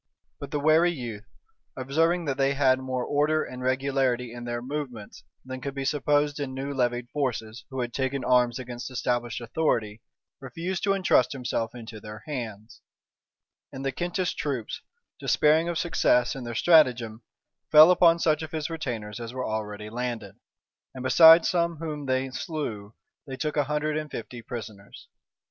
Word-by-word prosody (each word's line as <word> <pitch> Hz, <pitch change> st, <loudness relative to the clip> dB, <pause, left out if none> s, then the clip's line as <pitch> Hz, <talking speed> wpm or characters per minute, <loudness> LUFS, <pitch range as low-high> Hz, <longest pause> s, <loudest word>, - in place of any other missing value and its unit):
But 140 Hz, -, -7 dB
the 145 Hz, -, -2 dB
wary 155 Hz, +4 st, +4 dB
youth, 120 Hz, -8 st, -7 dB, 0.5 s
observing 165 Hz, +6 st, +1 dB
that 140 Hz, -3 st, -1 dB
they 140 Hz, 0 st, +2 dB
had 130 Hz, -2 st, +3 dB
more 130 Hz, -1 st, -3 dB
order 150 Hz, +2 st, +1 dB
and 125 Hz, 0 st, -8 dB
regularity 130 Hz, -2 st, 0 dB
in 120 Hz, 0 st, -8 dB
their 120 Hz, 0 st, -3 dB
movements 125 Hz, -4 st, -6 dB, 0.2 s
than 130 Hz, 0 st, -7 dB
could 140 Hz, 0 st, -5 dB
be 135 Hz, -1 st, -3 dB
supposed 145 Hz, +1 st, +1 dB
in 135 Hz, -2 st, -4 dB
new 135 Hz, +2 st, -4 dB
levied 120 Hz, -2 st, -1 dB
forces 120 Hz, -5 st, -3 dB
who 130 Hz, -1 st, -3 dB
had 120 Hz, -1 st, -4 dB
taken 135 Hz, 0 st, -2 dB
arms 125 Hz, -1 st, +3 dB
against 125 Hz, 0 st, -7 dB
established 120 Hz, -3 st, -2 dB
authority, 115 Hz, -4 st, -1 dB, 0.4 s
refused 165 Hz, +8 st, -4 dB
to 195 Hz, -, +3 dB
intrust 185 Hz, -10 st, +3 dB
himself 125 Hz, -3 st, -3 dB
into 115 Hz, -2 st, -9 dB
their 105 Hz, 0 st, -10 dB
hands; 115 Hz, -7 st, -7 dB, 0.9 s
and 135 Hz, +1 st, -7 dB
the 135 Hz, -, 0 dB
Kentish 175 Hz, +5 st, -2 dB
troops, 135 Hz, -, -4 dB, 0.4 s
despairing 160 Hz, +3 st, +3 dB
of 170 Hz, -, -2 dB
success 125 Hz, -8 st, +2 dB
in 130 Hz, -2 st, -6 dB
their 120 Hz, -1 st, -5 dB
stratagem, 125 Hz, -8 st, +4 dB, 0.5 s
fell 155 Hz, +3 st, +9 dB
upon 170 Hz, -2 st, +5 dB
such 155 Hz, -2 st, +1 dB
of 160 Hz, 0 st, -7 dB
his 160 Hz, +1 st, -3 dB
retainers 120 Hz, -10 st, -5 dB
as 120 Hz, +1 st, -7 dB
were 130 Hz, -, -2 dB
already 105 Hz, -1 st, -4 dB
landed; 120 Hz, -4 st, -4 dB, 0.6 s
and 130 Hz, -, -6 dB
besides 160 Hz, +5 st, +8 dB
some 170 Hz, -2 st, +1 dB
whom 150 Hz, -3 st, -5 dB
they 130 Hz, 0 st, 0 dB
slew, 120 Hz, -, -5 dB, 0.3 s
they 135 Hz, -1 st, -6 dB
took 150 Hz, +1 st, -2 dB
a 145 Hz, -2 st, +2 dB
hundred 150 Hz, +1 st, -1 dB
and 155 Hz, -1 st, -4 dB
fifty 120 Hz, 0 st, -7 dB
prisoners. 110 Hz, -4 st, -9 dB
130 Hz, 165 wpm, -26 LUFS, 120-150 Hz, 0.9 s, fell